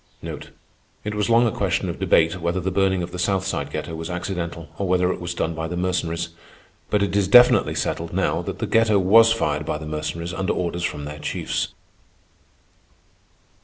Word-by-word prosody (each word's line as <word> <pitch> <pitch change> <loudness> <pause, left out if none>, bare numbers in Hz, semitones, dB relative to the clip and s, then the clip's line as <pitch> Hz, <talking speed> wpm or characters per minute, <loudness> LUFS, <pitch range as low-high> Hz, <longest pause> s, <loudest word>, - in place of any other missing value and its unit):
It 105 - -3
was 105 0 -1
long 115 +1 +5
a 115 - +1
question - - -1
of - - -5
debate, 85 +2 +2
whether 85 +2 0
the 95 +1 -2
burning 95 -1 +1
of 85 - -6
the 90 - -6
South 95 +1 0
Side 95 - -2
ghetto - - -5
was 80 +1 -5
accidental, 90 -2 -4
or 100 - -1
whether 90 0 +2
it - - -9
was 85 0 -4
done 80 - -1
by 80 0 -4
the 90 +1 -4
Mercenaries; 90 -2 -1 0.6
but 105 -1 +2
it 100 - -1
is 100 -2 +2
definitely 120 +5 +6
settled - - -2
now - - 0
that - - -5
the - - -2
ghetto 115 -2 +3
was 110 +5 +6
fired 75 -10 0
by 75 - -2
the 80 - -8
Mercenaries 80 +3 -4
under 95 +1 -1
orders 85 -1 -2
from 75 -4 -3
their 75 +1 -7
chiefs. - - -3
90 Hz, 195 wpm, -23 LUFS, 85-100 Hz, 0.6 s, definitely